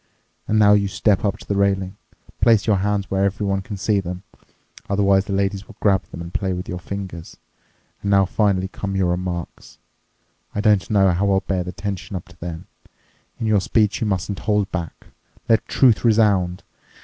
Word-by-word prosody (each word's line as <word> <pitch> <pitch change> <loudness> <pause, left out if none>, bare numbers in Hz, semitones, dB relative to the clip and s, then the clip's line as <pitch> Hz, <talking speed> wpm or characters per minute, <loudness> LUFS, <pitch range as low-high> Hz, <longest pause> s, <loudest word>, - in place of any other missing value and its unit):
And 110 - +1
now 105 -1 +6
you 100 -1 +3
step 100 +1 +1
up 100 -1 0
to - - -15
the 100 - -1
railing. 95 -1 +1 0.5
Place 115 -3 +4
your 105 -3 +3
hands 100 +1 -1
where 95 0 +1
everyone 100 0 0
can 100 +1 -7
see 100 +1 +1
them. 90 0 -6 0.7
Otherwise 100 -1 +3
the - - -6
ladies 100 0 -1
will - - -14
grab 95 -2 +2
them 85 - -9
and 85 - -9
play 95 -2 -1
with 90 0 -5
your 90 - -4
fingers. 95 -3 -7 0.6
And 100 - -3
now 100 -1 +5
finally 95 -1 +1
come 95 0 -5
your 95 -2 +1
remarks. 90 -1 -5 0.8
I - - -1
don't 105 -2 +2
know 95 -3 +4
how 95 +3 +1
I'll 95 -1 +3
bear 95 -2 -2
the 90 - -6
tension 100 +1 -5
up 90 - -6
to 85 - -18
then. 85 0 -6 0.7
In 115 - -2
your 105 -3 +3
speech 105 +3 +1
you 110 - 0
mustn't 95 0 -2
hold 105 -2 0
back. 85 -3 -5 0.4
Let 115 -2 +2
truth 120 -7 +3
resound. 105 -6 +2
100 Hz, 190 wpm, -21 LUFS, 95-105 Hz, 0.8 s, now